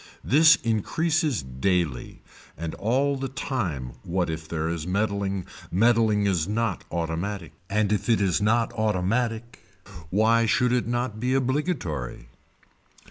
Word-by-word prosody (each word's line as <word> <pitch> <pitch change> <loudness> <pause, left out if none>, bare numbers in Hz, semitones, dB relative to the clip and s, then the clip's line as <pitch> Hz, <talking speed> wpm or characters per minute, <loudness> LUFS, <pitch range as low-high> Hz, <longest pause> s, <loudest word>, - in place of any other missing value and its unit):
This 155 +5 +6
increases 150 - 0
daily 65 +1 -2 0.3
and 80 0 -4
all 135 +6 +1
the 135 0 -3
time 95 - -3
what 90 -1 -1
if 80 0 -6
there 80 0 -2
is 85 -1 -3
meddling, 100 -1 -1 0.2
meddling 110 +1 +3
is 90 -5 +1
not 115 +2 -1
automatic, 85 +3 -3 0.2
and 105 0 +1
if 105 +2 -2
it 115 - +4
is 95 -1 +1
automatic 110 +1 0 0.5
why 115 +4 +3
should 125 +3 +2
it 125 -2 +1
not 120 -2 -2
be 125 +3 0
obligatory. 130 - -2
105 Hz, 125 wpm, -25 LUFS, 90-120 Hz, 0.5 s, This